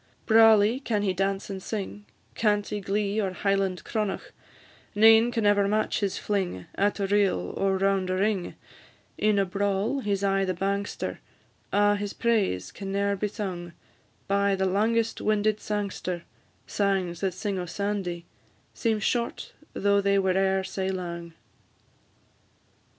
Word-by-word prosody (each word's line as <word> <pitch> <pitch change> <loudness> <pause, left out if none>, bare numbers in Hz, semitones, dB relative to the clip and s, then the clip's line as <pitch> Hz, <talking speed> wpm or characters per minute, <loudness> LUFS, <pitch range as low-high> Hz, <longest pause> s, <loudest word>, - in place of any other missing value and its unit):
"Brawly 225 +1 +6
can 215 -6 -1
he 190 -2 +1
dance 195 +1 -1
and 190 -1 -5
sing, 205 0 -5 0.3
Canty 210 -1 0
glee 205 +2 0
or 190 -2 -2
Highland 195 -1 0
cronach; 215 - -3 0.6
Nane 225 +2 +6
can 225 -3 -1
ever 205 -1 +4
match 215 +1 0
his 200 -3 -1
fling, 185 - -2
At 205 +1 0
a 200 - +1
reel 195 - +1
or 195 -1 +1
round 195 -1 +1
a 185 - 0
ring, 195 -1 0 0.6
In 215 -1 +3
a 195 - +3
brawl 200 +6 0
he 205 -6 0
's 195 - -5
aye 195 0 +2
the 185 -1 -1
bangster: 200 +2 -2 0.5
A' 205 0 +3
his 205 0 -4
praise 200 - 0
can 195 -1 -6
ne'er 200 0 +1
be 210 +2 -1
sung 185 -5 -5 0.5
By 200 0 +2
the 190 0 0
langest 220 +4 +1
winded 215 0 +1
sangster; 200 -4 -3 0.4
Sangs 190 -4 -1
that 190 -2 -1
sing 195 0 -2
o' 180 - -4
Sandy, 185 -2 -3 0.5
Seem 225 -2 0
short, 235 +3 -2 0.2
though 200 0 +2
they 200 0 +2
were 190 -1 +2
e'er 190 0 +2
sae 190 0 -3
lang." 170 -3 -5
200 Hz, 150 wpm, -27 LUFS, 190-210 Hz, 0.6 s, Brawly